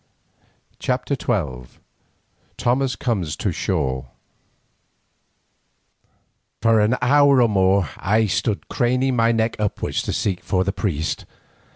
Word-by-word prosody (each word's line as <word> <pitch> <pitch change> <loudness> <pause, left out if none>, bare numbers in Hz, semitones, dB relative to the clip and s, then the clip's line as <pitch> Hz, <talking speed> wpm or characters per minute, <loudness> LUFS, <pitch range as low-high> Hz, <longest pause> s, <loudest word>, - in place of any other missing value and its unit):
CHAPTER 130 +2 -1
XII 75 - -3 0.8
THOMAS 130 +1 +1
COMES 95 - -2
TO 100 - -2
SHORE 65 -9 -2 2.5
For 115 0 +3
an 105 +4 +2
hour 140 +1 +5
or 120 - +5
more 95 -3 +2
I 110 +3 +2
stood 105 +1 -1
thus - - -32
craning 125 +1 +1
my 115 0 +3
neck 115 0 0
upwards 105 -2 -1
to - - -3
seek 95 -4 -2
for 95 -1 +1
the 100 +1 -2
priest. 80 -8 -2
110 Hz, 115 wpm, -21 LUFS, 95-125 Hz, 2.5 s, hour